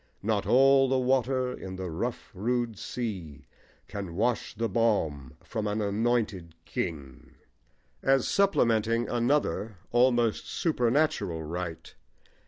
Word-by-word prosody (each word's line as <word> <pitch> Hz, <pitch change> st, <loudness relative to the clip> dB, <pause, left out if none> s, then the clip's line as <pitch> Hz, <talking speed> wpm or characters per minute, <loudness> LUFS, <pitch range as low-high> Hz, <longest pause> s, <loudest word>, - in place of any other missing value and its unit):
Not 105 Hz, -1 st, 0 dB
all 135 Hz, +1 st, +5 dB
the 130 Hz, -, +2 dB
water 130 Hz, 0 st, +1 dB
in 95 Hz, -5 st, -7 dB
the 95 Hz, -2 st, -5 dB
rough 115 Hz, +9 st, -4 dB
rude 120 Hz, +3 st, -1 dB
sea 95 Hz, -, -5 dB, 0.4 s
Can 95 Hz, -5 st, -6 dB
wash 115 Hz, +4 st, 0 dB
the 115 Hz, +2 st, -1 dB
balm 95 Hz, -, 0 dB
from 110 Hz, -1 st, -3 dB
an 105 Hz, +1 st, -1 dB
anointed 105 Hz, -5 st, -1 dB
king, 70 Hz, -3 st, -5 dB, 0.7 s
as 135 Hz, -1 st, +3 dB
supplementing 115 Hz, -, +2 dB
another, 120 Hz, -4 st, 0 dB
almost 120 Hz, -2 st, +2 dB
supernatural, 120 Hz, -, +1 dB
right. 85 Hz, +1 st, -5 dB
115 Hz, 110 wpm, -28 LUFS, 95-125 Hz, 0.7 s, all